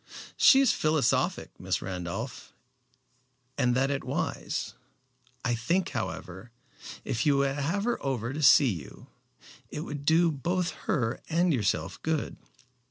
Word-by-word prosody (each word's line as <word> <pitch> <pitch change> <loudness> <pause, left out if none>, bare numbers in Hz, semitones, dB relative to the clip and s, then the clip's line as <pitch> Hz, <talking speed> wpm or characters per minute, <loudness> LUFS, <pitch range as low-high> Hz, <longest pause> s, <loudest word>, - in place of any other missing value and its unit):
"She 270 - +7
is 270 - +4
philosophic, 155 -5 +1
Miss - - -1
Randolph, 95 +6 -6 1.0
and 125 -3 +1
that 135 +2 +2
is 140 - -1
wise. - - -3 0.7
I 120 - +1
think, 165 +11 0
however, 95 +2 -5 0.6
if 115 - -1
you 145 -2 +3
would 140 0 +1
have 165 +8 -1
her 240 +1 -1
over 130 -3 -2
to 155 - -4
see 140 -3 +6
you, 80 -8 -9 0.6
it 150 - -5
would 145 -2 -6
do 165 +3 +4
both 175 +5 -1 0.2
her 120 -3 0
and 170 +1 +2
yourself 105 -7 -1
good." 160 -1 -2
140 Hz, 135 wpm, -28 LUFS, 115-160 Hz, 1.0 s, She